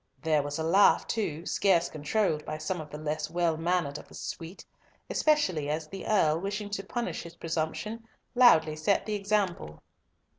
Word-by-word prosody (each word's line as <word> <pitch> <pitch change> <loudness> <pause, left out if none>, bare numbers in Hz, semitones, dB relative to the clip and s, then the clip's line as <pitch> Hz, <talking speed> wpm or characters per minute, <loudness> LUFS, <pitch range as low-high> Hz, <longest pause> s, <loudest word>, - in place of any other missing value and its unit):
There 155 -3 +2
was 145 0 -4
a 160 - -2
laugh 190 +5 +5
too, 170 -7 -3
scarce 180 -4 +2
controlled 155 +1 -1
by 155 - -5
some 160 +2 -3
of 155 - -10
the 150 - -7
less 155 0 -3
well 170 -2 +1
mannered 165 -3 -1
of - - -14
the - - -14
suite, 170 +3 -7 0.5
especially 185 - +2
as 155 +1 -2
the 195 +4 -8
Earl, 165 -7 +3
wishing 205 +2 -4
to 195 -1 -3
punish 240 +4 -3
his 170 0 -11
presumption, 170 +8 -3 0.3
loudly 165 -12 +5
set 155 +6 +1
the 215 - -3
example. 195 - -1
170 Hz, 175 wpm, -29 LUFS, 155-200 Hz, 0.5 s, laugh